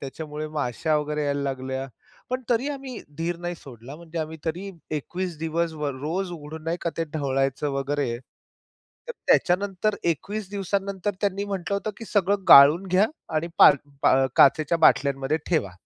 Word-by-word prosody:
त्याच्यामुळे 150 +2 -6
माश्या 150 +1 -1
वगैरे 150 0 -2
यायला 140 0 -1
लागल्या. 130 0 -3 0.4
पण 255 0 -2
तरी 245 +4 +2
आम्ही 270 -4 -6 0.2
धीर 170 +1 -1
नाही 175 0 -4
सोडला. 135 -2 -11
म्हणजे 170 0 -8
आम्ही 160 0 -4
तरी 180 +5 -3 0.3
21 180 +3 -5
दिवस 165 +1 -1
वर 140 -2 -1
रोज 175 +6 -2
उघडून 155 -1 -8
नाही 165 +1 -1
का, 170 - -1
ते 165 - 0
ढवळायचं 135 -1 -1
वगैरे. 135 -3 -1 0.9
तर - - -3
त्याच्यानंतर 200 +3 +2
21 195 +5 -2
दिवसानंतर 200 0 -2
त्यांनी 200 0 0
म्हटलं 200 -1 -3
होतं, 205 +2 -2
"की 230 - -8
सगळं 200 -2 0
गाळून 150 +7 +9
घ्या 190 +3 +3 0.3
आणि 160 +2 0
पार - - +8 0.3
पा 135 0 +4
काचेच्या 155 +4 +5
बाटल्यांमध्ये 140 -1 +3
ठेवा." 155 - 0
165 Hz, 155 wpm, -25 LUFS, 140-195 Hz, 0.9 s, गाळून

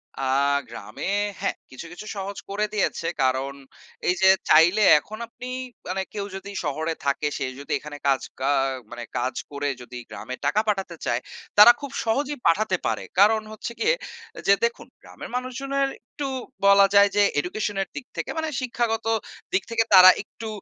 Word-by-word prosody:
আ - - -6 0.5
গ্রামে 105 -2 -8 0.4
হ্যা! 195 - +1 0.2
কিছু, 130 +6 -9
কিছু 195 - -9
সহজ 195 +1 -5
করে 205 +2 0
দিয়েছে 195 -5 -1
কারণ 130 +1 +1 0.5
এই 180 - +3
যে 190 - +6 0.2
চাইলে 170 +7 +6 0.2
এখন 215 +8 -10
আপনি 245 +2 -10 0.4
মানে 190 +2 -2
কেউ 205 -1 -3
যদি 195 +1 -7
শহরে 160 +2 -2
থাকে, 140 +2 0
সে - - -2
যদি 140 - -9
এখানে 145 0 -9
কাজ 135 -1 +3 0.2
কা 135 +1 0 0.4
মানে 120 0 -6
কাজ 125 +2 -1 0.2
করে 145 0 -3
যদি 125 0 -9
গ্রামে 110 +7 -7
টাকা 175 +9 +3
পাঠাতে 195 -4 -1
চায়, 120 +1 0 0.4
তারা 210 +3 +11
খুব 280 -2 -6
সহজেই 280 +5 -1
পাঠাতে 190 +3 +2
পারে - - -1 0.2
কারণ 215 +2 +5
হচ্ছে 220 +3 -6
গিয়ে - - +3 0.4
এ - - -6
যে 200 - +7
দেখুন, 235 +1 -4
গ্রামের - - -10
মানুষজনের 275 +2 -1
একটু 280 +4 -7 0.4
বলা 200 0 +7
যায় 200 0 +7
যে 205 - +4 0.2
education 205 +6 -3
এর 195 - -2
দিক 285 - -6
থেকে - - -3
মানে 320 0 -1
শিক্ষাগত 235 -3 -1 0.5
দিক 185 0 +2
থেকে 230 0 +2
তারা 185 -1 +11
একটু 225 +1 -10
195 Hz, 170 wpm, -24 LUFS, 145-225 Hz, 0.5 s, তারা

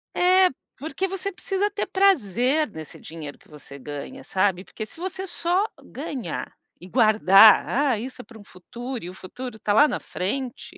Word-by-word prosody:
É, 370 +1 +5 0.3
porque 320 +7 -3
você 385 +1 -4
precisa 390 +2 -1
ter 410 - -3
prazer 290 - +2
nesse 160 -3 -10
dinheiro 155 -3 -9
que - - -24
você 140 -2 -12
ganha, 145 - -8
sabe, 190 -1 0
porque 215 - -7
se 325 +10 -14
você 375 +1 -4
só 355 +2 0 0.2
ganhar 245 - -6 0.3
e 180 - -12
guardar: 215 -2 +6
"Ah, 270 -2 +1
isso 255 +2 -7
é - - -17
pra 230 -2 -14
um 205 - -14
futuro 240 +7 -8
e 175 - -6
o - - -9
futuro 245 +6 -8
tá 205 - 0
lá 295 +8 +6
na - - -3
frente", 245 +7 -5
245 Hz, 180 wpm, -24 LUFS, -, 0.3 s, guardar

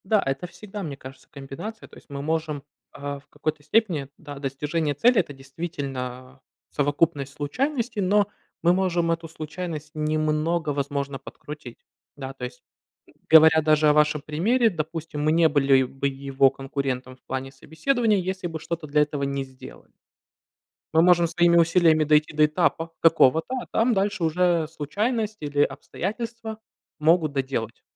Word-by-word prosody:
Да, 210 +1 +3
это 135 +5 -2
всегда, 195 +3 -8
мне 145 -5 -5
кажется, 130 0 -12
комбинация. 140 +11 -8
То - - -16
есть - - -18
мы 140 -1 -5
можем, 155 -1 -2 0.3
а, 140 0 -6
в 140 - -26
какой-то 150 0 -4
степени, 160 -5 +1
да, 145 -2 -9
достижение 145 +3 -2
цели- 240 - +4
это 150 -5 -2
действительно 135 -3 -6 0.3
совокупность 145 -1 0
случайностей, 235 - -2
но 200 +2 +3 0.4
мы 175 +1 +5
можем 175 -3 +1
эту 165 0 -2
случайность 155 -1 -6
немного, 155 +1 0
возможно, 140 -1 -2
подкрутить. 145 -1 -10 0.3
Да, 135 -1 -6
то 135 - -11
есть, 125 0 -9 0.7
говоря 160 0 +8
даже 155 0 +3
о 150 - +6
вашем 150 0 +3
примере, 215 - +2
допустим, 160 -3 -4
мы 155 - +3
не 165 0 +5
были 135 -3 +4
бы 135 +2 -2
его 135 0 +2
конкурентом 135 -1 -4
в 130 - -32
плане 130 0 -4
собеседования, 210 - 0
если 185 0 -2
бы 165 -1 -6
что-то 165 0 -5
для 150 +1 +3
этого 145 -1 -4
не 140 0 -1
сделали. 130 -1 -14 1.0
Мы 160 - +6
можем 175 0 +5
своими 170 +1 +3
усилиями 165 -2 +4
дойти 150 0 +3
до 155 0 +5
этапа 165 +1 0
такого-то, 165 - +4
а - - -8
там 235 +2 +2
дальше 200 -1 0
уже 170 0 +2
случайность 210 - -2
или 145 -1 -1
обстоятельства 220 +7 -3 0.4
могут 160 0 +3
доделать. 130 -4 -3
155 Hz, 150 wpm, -25 LUFS, 140-175 Hz, 1.0 s, говоря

